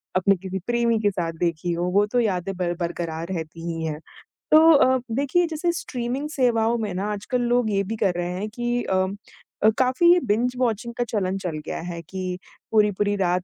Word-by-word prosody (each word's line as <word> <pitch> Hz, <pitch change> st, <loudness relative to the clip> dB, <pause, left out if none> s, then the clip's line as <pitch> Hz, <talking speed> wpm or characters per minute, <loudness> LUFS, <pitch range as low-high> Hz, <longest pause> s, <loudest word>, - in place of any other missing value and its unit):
अपने 195 Hz, +2 st, +4 dB
किसी 190 Hz, +1 st, -5 dB
प्रेमी 235 Hz, -1 st, +2 dB
के 205 Hz, -, +3 dB
साथ 170 Hz, -3 st, -2 dB
देखी 170 Hz, 0 st, -1 dB
हों, 175 Hz, +1 st, -1 dB
वो 205 Hz, +1 st, +4 dB
तो 245 Hz, +4 st, 0 dB
यादें 195 Hz, -4 st, -1 dB
बर 175 Hz, -1 st, -1 dB
बरकरार 170 Hz, -1 st, -3 dB
रहती 165 Hz, -1 st, -6 dB
ही 165 Hz, -1 st, -3 dB
हैं। 155 Hz, -1 st, -3 dB, 0.5 s
तो 320 Hz, +1 st, +8 dB
अ, 260 Hz, -3 st, +4 dB
देखिए 285 Hz, +8 st, +2 dB
जैसे 325 Hz, +2 st, -1 dB
स्ट्रीमिंग 255 Hz, +4 st, -3 dB
सेवाओं 235 Hz, -5 st, +2 dB
में 215 Hz, -4 st, -3 dB
ना 195 Hz, +3 st, -2 dB
आजकल 245 Hz, +5 st, -2 dB
लोग 240 Hz, -1 st, +2 dB
ये 200 Hz, -1 st, +1 dB
भी 215 Hz, +4 st, -4 dB
कर 190 Hz, -3 st, +2 dB
रहे 175 Hz, 0 st, -2 dB
हैं 200 Hz, +4 st, -4 dB
कि 240 Hz, +2 st, -2 dB
अम, 190 Hz, +1 st, 0 dB, 0.5 s
अ, 215 Hz, -, +7 dB
काफ़ी 340 Hz, +8 st, +5 dB
बिंज 235 Hz, +4 st, +1 dB
वॉचिंग 235 Hz, -1 st, -1 dB
का 245 Hz, -, 0 dB
चलन 195 Hz, -5 st, -1 dB
चल 175 Hz, -5 st, -4 dB
गया -, -, -4 dB
है 170 Hz, -1 st, -6 dB
कि 185 Hz, +2 st, -5 dB, 0.3 s
पूरी-पूरी 205 Hz, -1 st, +2 dB
रात 180 Hz, -1 st, +1 dB
205 Hz, 195 wpm, -24 LUFS, 180-240 Hz, 0.5 s, तो